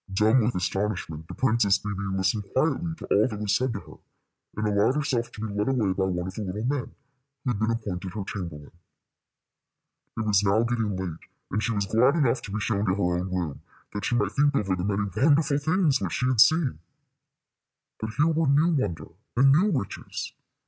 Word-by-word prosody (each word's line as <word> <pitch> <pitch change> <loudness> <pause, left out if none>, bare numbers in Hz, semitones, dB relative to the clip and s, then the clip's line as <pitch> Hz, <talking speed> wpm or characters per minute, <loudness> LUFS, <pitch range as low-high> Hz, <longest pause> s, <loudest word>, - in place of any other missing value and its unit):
Dumb 110 +6 +4
with 120 +3 0
astonishment, 90 -4 -2
the - - -8
Princess 110 -5 +3
Bébè 100 -2 -4
listened 95 +2 0
quietly 160 +4 +1
to - - -9
all 105 +3 +3
that 105 -4 -6
was 105 -2 +1
said 130 0 +1
to 100 - -4
her, - - -14 0.6
and 110 0 0
allowed 105 +5 +2
herself 130 -5 -1
to 105 - -10
be 105 - -5
led 105 +1 -1
away 110 -8 +1
by 95 0 0
one 90 -2 -2
of 95 - -5
the 110 - -5
little 105 +2 -4
men, 130 +1 -2 0.5
who 125 - +1
had 105 - -3
been 110 +1 +1
appointed 100 -5 -3
her 105 - -3
chamberlain. 85 -7 -7 1.5
It 110 - -1
was 105 -2 +3
now 105 +2 +3
getting 115 -4 -1
late, 90 -4 -4 0.3
and 100 - 0
she 115 - 0
was 100 -2 0
glad 125 - +3
enough 130 -6 +2
to 100 - -8
be 105 - -2
shown 105 0 -1
to 90 - +2
her 90 -3 0
own 90 +1 -4
room, 85 -6 -3 0.3
that 105 -1 -4
she 120 - 0
might 105 -4 +1
think 145 +2 +2
over 100 -6 +1
the 90 - -4
many 100 0 0
wonderful 145 +3 +3
things 155 -3 +2
which 95 -3 -2
she 125 - 0
had 125 -3 +4
seen. 150 - +4 1.2
But 110 0 -5
here 150 - +4
were 165 -1 +2
new 145 +5 +4
wonder 85 - -2 0.3
and 135 +2 +6
new 180 +9 +4
riches. 130 - -4
105 Hz, 210 wpm, -26 LUFS, 95-130 Hz, 1.5 s, and